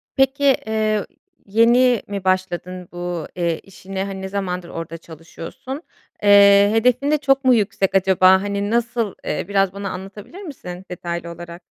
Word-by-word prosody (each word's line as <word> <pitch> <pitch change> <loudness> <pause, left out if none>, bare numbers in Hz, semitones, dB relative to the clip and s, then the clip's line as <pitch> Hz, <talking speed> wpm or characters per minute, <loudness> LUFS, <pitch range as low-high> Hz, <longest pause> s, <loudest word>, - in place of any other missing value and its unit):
Peki, 270 +1 +2 0.2
eee, 215 -1 0 0.4
yeni 235 +3 +4
mi 200 -2 -5
başladın 185 -1 -2
bu, 175 -2 -5
eee, 170 -2 -1
işine? 195 0 -7
Hani, 195 -1 -6
ne 190 - -4
zamandır 180 -3 -4
orada 165 0 -6
çalışıyorsun? 165 - -9 0.4
Eee, 200 0 +7
hedefin 250 +5 +2
de 305 - +3
çok 270 -2 +1
mu 255 - +6
yüksek 195 -3 0
acaba? 190 0 +5
Hani 200 0 -2
nasıl? 235 -2 0
Eee, - - -2
biraz 195 -2 +1
bana 200 0 -5
anlatabilir 195 - -9
misin 190 - -9
detaylı 170 -1 -5
olarak? 170 +1 -10
195 Hz, 150 wpm, -20 LUFS, 180-225 Hz, 0.4 s, Eee